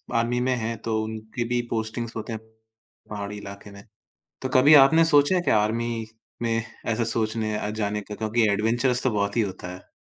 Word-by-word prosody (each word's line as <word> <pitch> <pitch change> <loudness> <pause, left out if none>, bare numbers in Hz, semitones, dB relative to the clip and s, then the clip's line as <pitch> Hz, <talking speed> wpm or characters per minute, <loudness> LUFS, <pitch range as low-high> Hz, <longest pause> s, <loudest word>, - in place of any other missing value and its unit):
Army 120 +1 +1
में 130 0 +1
हैं 115 0 -3
तो 110 -1 -1
उनकी 110 +2 -5
भी 120 0 +1
पोस्टिंग्स 115 +1 -3
होते 115 +1 -5
हैं, 110 - -4 0.7
पहाड़ी 105 0 -5
इलाके 100 0 -10
में। 100 0 -12 0.6
तो 130 - -1
कभी 140 +4 +7
आपने 160 +4 +5
सोचा 145 +2 +4
है 180 - +2
क्या 110 - +3
आर्मी 115 +1 -1 0.4
में 115 -1 0 0.3
ऐसा 115 +1 0
सोचने 110 -1 -1
अ, 105 - -3
जाने 105 -1 -2
का 105 0 -8
क्योंकि 110 +1 +1
एडवेंचरस 120 +5 +1
तो 130 - +3
बहुत 100 0 -1
ही 115 - +4
होता 95 -3 -5
है? 90 - -14
110 Hz, 190 wpm, -25 LUFS, 105-120 Hz, 0.7 s, कभी